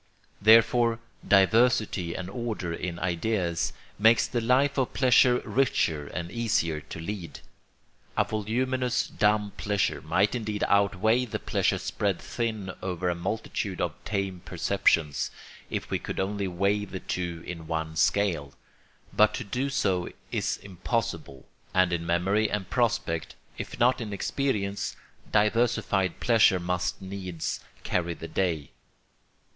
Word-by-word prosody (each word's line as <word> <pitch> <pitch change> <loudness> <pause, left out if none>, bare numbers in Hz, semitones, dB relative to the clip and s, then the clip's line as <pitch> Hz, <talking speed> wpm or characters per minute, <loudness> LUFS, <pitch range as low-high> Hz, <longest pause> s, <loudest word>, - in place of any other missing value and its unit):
Therefore 115 +2 +5 0.3
diversity 100 -3 +3
and 95 - -4
order 105 -5 -3
in 85 0 -4
ideas 90 0 -1 0.3
makes 110 +2 +5
the 120 - -2
life 130 +5 +3
of 130 - -1
pleasure 125 -1 +5
richer 80 - +1
and 85 +2 -5
easier 85 -10 0
to 80 +2 -9
lead. 85 -4 -6 0.8
A - - +5
voluminous 125 +4 0
dumb 105 0 +1
pleasure 100 -1 0
might 90 +6 +2
indeed 110 -4 -2
outweigh 100 +4 +3
the 115 - -3
pleasure - - 0
spread 100 -3 -1
thin 110 -5 -3
over 90 -1 -2
a - - +1
multitude 95 +1 -3
of 85 -3 0
tame 95 -3 -2
perceptions, 85 -5 +1 0.4
if - - -4
we - - +1
could - - -5
only 100 +1 -1
weigh 100 +3 +1
the 95 -2 -6
two 85 -2 -4
in 85 -2 -7
one 80 -1 -3
scale; 85 -6 +1 0.6
but - - +4
to - - -4
do 125 +7 -2
so 95 -9 0 0.2
is - - -1
impossible, 95 - -3 0.3
and 95 -1 +4
in 85 -1 -2
memory 95 +5 +2
and 100 -3 -3
prospect, 110 -9 0 0.2
if - - -6
not 125 +1 +3
in 105 -3 -4
experience, 100 -3 -1 0.4
diversified 105 -3 +2
pleasure 110 -6 +4
must 90 +1 -2
needs 95 -4 -4 0.2
carry 85 -1 -1
the 80 - -8
day. 80 -3 -1
100 Hz, 130 wpm, -27 LUFS, 85-115 Hz, 0.8 s, Therefore